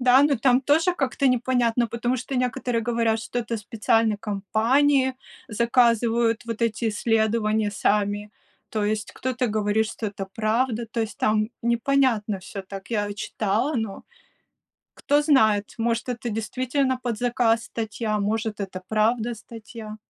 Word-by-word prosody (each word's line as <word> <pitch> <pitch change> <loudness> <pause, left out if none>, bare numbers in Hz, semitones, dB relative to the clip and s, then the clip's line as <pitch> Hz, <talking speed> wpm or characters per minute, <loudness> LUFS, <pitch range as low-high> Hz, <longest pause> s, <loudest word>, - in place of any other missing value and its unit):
Да, 255 +2 +6
но 285 -2 +3
там 255 +1 +4
тоже 320 +6 +2
как-то 275 -3 0
непонятно, 245 -2 +2
потому 240 +3 -1
что 255 +2 -4
некоторые 245 -1 -1
говорят, 230 -1 +1
что 245 +2 -3
это 230 0 -3
специальной 220 +1 +1
компании 235 +7 +2 0.3
заказывают 235 0 +2
вот 230 0 -4
эти 230 0 0
исследования 220 -1 +1
сами. 205 +1 0 0.4
То 215 -2 -1
есть 215 0 -1
кто-то 250 -1 -2
говорит, 215 0 +1
что 225 - -5
это 200 -1 -5
правда. 230 +1 0
То 230 0 -3
есть 220 - -4
там 215 +1 +1
непонятно 235 -4 +1
всё, 195 +1 -8
так 195 +2 -9
я 205 -2 -1
читала, 215 +6 -1
но 220 -4 -3 0.9
кто 290 +1 +2
знает, 220 -9 +3
может, 230 +2 -1
это 240 -1 -3
действительно 255 +4 -1
под 235 -3 -2
заказ 240 -2 +1
статья, 215 -1 -3
может 220 +1 -2
это 185 -2 -5
правда 225 +2 +1
статья. 220 -1 -10
230 Hz, 140 wpm, -24 LUFS, 215-245 Hz, 0.9 s, Да